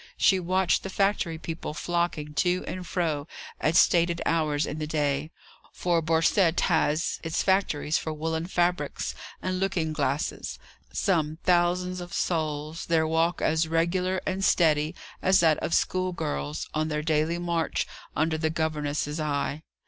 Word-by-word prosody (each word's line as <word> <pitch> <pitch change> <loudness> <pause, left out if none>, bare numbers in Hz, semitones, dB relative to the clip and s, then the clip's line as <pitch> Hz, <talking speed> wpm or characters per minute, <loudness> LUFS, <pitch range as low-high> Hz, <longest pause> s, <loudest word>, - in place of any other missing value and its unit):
She 190 - +4
watched 185 +1 +2
the 195 - -6
factory 195 -4 0
people 160 -1 -5
flocking 170 -2 -1
to 180 +3 +1
and 185 -1 -5
fro 155 -5 -1 0.3
at 160 - +1
stated 170 0 +4
hours 155 -2 +1
in 155 - -5
the 155 - -3
day 150 -1 0 0.4
for 175 -2 +1
Borcette 165 +2 +3
has 155 +3 +1
its 165 -1 -1
factories 190 -6 +1
for 160 - -4
woollen 160 +2 -2
fabrics 180 -1 0 0.3
and 185 0 -1
looking 180 -5 0
glasses 145 -1 -2 0.3
some 160 -5 0
thousands 180 +1 +2
of 175 0 -8
souls, 155 -1 -2
their 160 -1 +3
walk 165 +2 +1
as 160 +1 +2
regular 180 +3 +1
and 190 +1 -1
steady 155 -2 +3 0.3
as 190 +1 +4
that 160 -2 +4
of - - -3
school 185 0 +1
girls 70 - -3
on 155 0 0
their 150 -1 -2
daily 155 +1 +1
march 170 -3 -1 0.3
under 160 +1 +1
the 160 0 +1
governess's 150 -1 -2
eye. 145 0 -1
165 Hz, 150 wpm, -27 LUFS, 155-175 Hz, 0.4 s, She